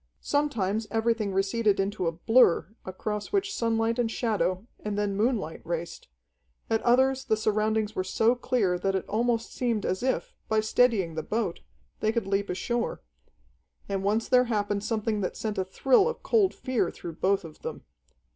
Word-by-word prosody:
Sometimes 220 Hz, -8 st, 0 dB
everything 225 Hz, -1 st, 0 dB
receded 195 Hz, +2 st, +1 dB
into 195 Hz, -2 st, -1 dB
a -, -, +2 dB
blur, 225 Hz, +4 st, +4 dB, 0.2 s
across 205 Hz, +3 st, -4 dB
which 395 Hz, 0 st, 0 dB
sunlight 230 Hz, -, 0 dB
and 235 Hz, -2 st, +1 dB
shadow, 215 Hz, -4 st, -1 dB
and 210 Hz, -1 st, -4 dB
then 205 Hz, -1 st, 0 dB
moonlight 210 Hz, -6 st, -1 dB
raced, 170 Hz, 0 st, -5 dB, 0.6 s
at 225 Hz, -, +2 dB
others 260 Hz, +2 st, +3 dB
the 220 Hz, -4 st, +1 dB
surroundings 215 Hz, 0 st, 0 dB
were 185 Hz, -, 0 dB
so 220 Hz, +5 st, +2 dB
clear 220 Hz, -7 st, 0 dB
that 195 Hz, +1 st, 0 dB
it 190 Hz, -, -2 dB
almost 230 Hz, +1 st, 0 dB
seemed 235 Hz, -5 st, -1 dB
as 185 Hz, -, -1 dB
if, 260 Hz, +1 st, -1 dB
by 220 Hz, -, +2 dB
steadying 215 Hz, -5 st, +2 dB
the 160 Hz, -, -3 dB
boat, 210 Hz, 0 st, -2 dB, 0.4 s
they 215 Hz, -, +1 dB
could 230 Hz, -3 st, -1 dB
leap 200 Hz, +1 st, -1 dB
ashore. 235 Hz, +6 st, -2 dB, 0.8 s
And 195 Hz, -1 st, -2 dB
once 215 Hz, +3 st, +1 dB
there 250 Hz, -1 st, +5 dB
happened 205 Hz, -3 st, -1 dB
something 215 Hz, -1 st, -1 dB
that 185 Hz, -, -3 dB
sent 215 Hz, -2 st, -3 dB
a -, -, +2 dB
thrill 265 Hz, -, +3 dB
of 475 Hz, -, -6 dB
cold 420 Hz, -5 st, +3 dB
fear 250 Hz, -9 st, 0 dB
through 165 Hz, -2 st, -8 dB
both 195 Hz, +1 st, +1 dB
of 160 Hz, -, -11 dB
them. 475 Hz, -, -6 dB
215 Hz, 170 wpm, -27 LUFS, 195-235 Hz, 0.8 s, there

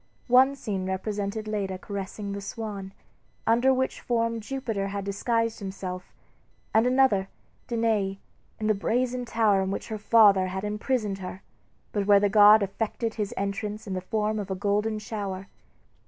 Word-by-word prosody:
One 260 Hz, +3 st, +6 dB
scene 195 Hz, -8 st, -3 dB
represented 205 Hz, +2 st, -3 dB
Leda 200 Hz, -3 st, -2 dB
caressing 200 Hz, +1 st, -5 dB
the 200 Hz, 0 st, -4 dB
swan, 200 Hz, -1 st, -6 dB, 0.5 s
under 240 Hz, +4 st, +4 dB
which 260 Hz, 0 st, -1 dB
form 230 Hz, -1 st, 0 dB
Jupiter 225 Hz, -4 st, -3 dB
had 200 Hz, 0 st, -4 dB
disguised 230 Hz, +3 st, 0 dB
himself; 190 Hz, -2 st, -6 dB, 0.6 s
and 225 Hz, +3 st, +4 dB
another, 250 Hz, -7 st, +3 dB, 0.4 s
Danae, 220 Hz, -5 st, 0 dB, 0.4 s
in 215 Hz, -, -3 dB
the 215 Hz, -, +4 dB
brazen 245 Hz, +4 st, -1 dB
tower 220 Hz, -4 st, +2 dB
in 190 Hz, -, -1 dB
which 195 Hz, -, -4 dB
her 215 Hz, -1 st, -4 dB
father 205 Hz, -4 st, +5 dB
had 190 Hz, +1 st, -4 dB
imprisoned 210 Hz, -1 st, -1 dB
her, 185 Hz, 0 st, -7 dB, 0.5 s
but 205 Hz, -1 st, -1 dB
where 200 Hz, -1 st, +7 dB
the 205 Hz, 0 st, +2 dB
god 210 Hz, +1 st, +7 dB
effected 220 Hz, +3 st, -2 dB
his 210 Hz, -3 st, -3 dB
entrance 205 Hz, +2 st, -3 dB
in 195 Hz, -, -4 dB
the 185 Hz, -, -2 dB
form 215 Hz, +3 st, -1 dB
of 200 Hz, -1 st, -5 dB
a 190 Hz, -, -1 dB
golden 210 Hz, +3 st, 0 dB
shower. 200 Hz, -3 st, -5 dB
210 Hz, 155 wpm, -27 LUFS, 195-225 Hz, 0.6 s, where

